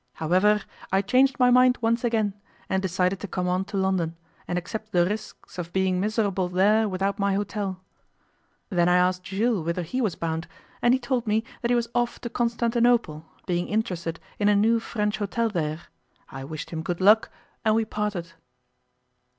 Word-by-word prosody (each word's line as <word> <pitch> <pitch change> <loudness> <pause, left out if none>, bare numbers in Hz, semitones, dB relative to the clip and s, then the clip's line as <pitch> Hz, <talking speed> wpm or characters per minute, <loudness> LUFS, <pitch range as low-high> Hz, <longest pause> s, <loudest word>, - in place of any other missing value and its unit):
However, 190 +6 +2 0.3
I 190 +1 +2
changed 255 +6 +3
my 250 0 +5
mind 250 0 +5
once 230 +1 +1
again, 220 -4 +1 0.3
and 190 0 0
decided 185 0 0
to 205 - -6
come 180 -1 -2
on 185 +1 0
to 200 0 -5
London, 190 -4 0 0.3
and 175 - -1
accept 215 +4 -5
the 175 -2 +3
risks 205 -1 -6
of 170 -1 -5
being 190 -1 +1
miserable 200 -3 0
there 210 +4 +3
without 195 +2 -1
my 200 -1 +1
hotel. 200 -2 -3 0.9
Then 175 -2 +3
I 180 - +4
asked 180 0 +2
Jules 205 -1 0
whither 170 +2 -2
he 255 +11 -2
was 210 -8 0
bound, 165 0 -3 0.3
and 240 +1 +5
he - - -1
told 245 -2 -2
me 215 +1 +2 0.2
that 235 - -1
he 245 - +4
was 235 -1 0
off 240 0 0
to 235 - -5
Constantinople, 235 -8 +1 0.2
being 175 -1 -1
interested 180 -6 -2 0.2
in 205 0 +3
a 205 - +4
new 225 +3 +3
French 210 -2 -2
hotel 225 +3 0
there. 160 -4 -2 0.5
I 135 0 -7
wished 155 +2 -7
him 160 -1 -3
good 170 +1 -3
luck, 210 +4 +5 0.3
and 215 -1 +3
we 225 0 +2
parted. 210 -6 -3
200 Hz, 185 wpm, -25 LUFS, 180-225 Hz, 0.9 s, my